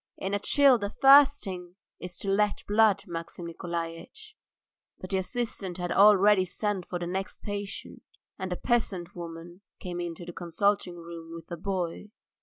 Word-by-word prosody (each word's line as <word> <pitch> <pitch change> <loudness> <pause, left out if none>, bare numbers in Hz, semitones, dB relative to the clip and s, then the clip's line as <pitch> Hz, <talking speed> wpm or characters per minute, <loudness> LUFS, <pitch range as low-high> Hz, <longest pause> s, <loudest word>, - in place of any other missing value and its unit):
In 195 +1 -3
a 205 - +1
chill 275 +2 +5
the 200 -1 -2
first 285 +1 +7
thing 180 -2 -6 0.2
is 180 0 -7
to 195 - -2
let 210 +1 +1
blood, 210 -1 +4
Maxim 170 -1 -7
Nikolaitch." 170 - -6 0.6
But 185 - -8
the 190 - +2
assistant 195 -3 -3
had 175 -1 -3
already 205 -1 +6
sent 190 +1 -3
for 180 - -3
the 175 - -4
next 190 +2 -4
patient, 205 -1 -6 0.4
and 190 -1 -4
a - - 0
peasant 200 -6 -1
woman 170 +1 -9 0.2
came 175 -1 -5
into 175 0 -5
the 175 - -8
consulting 180 +2 0
room 165 -1 -9
with 165 +1 -11
a - - -2
boy. 185 +2 -3
185 Hz, 165 wpm, -28 LUFS, 175-205 Hz, 0.6 s, first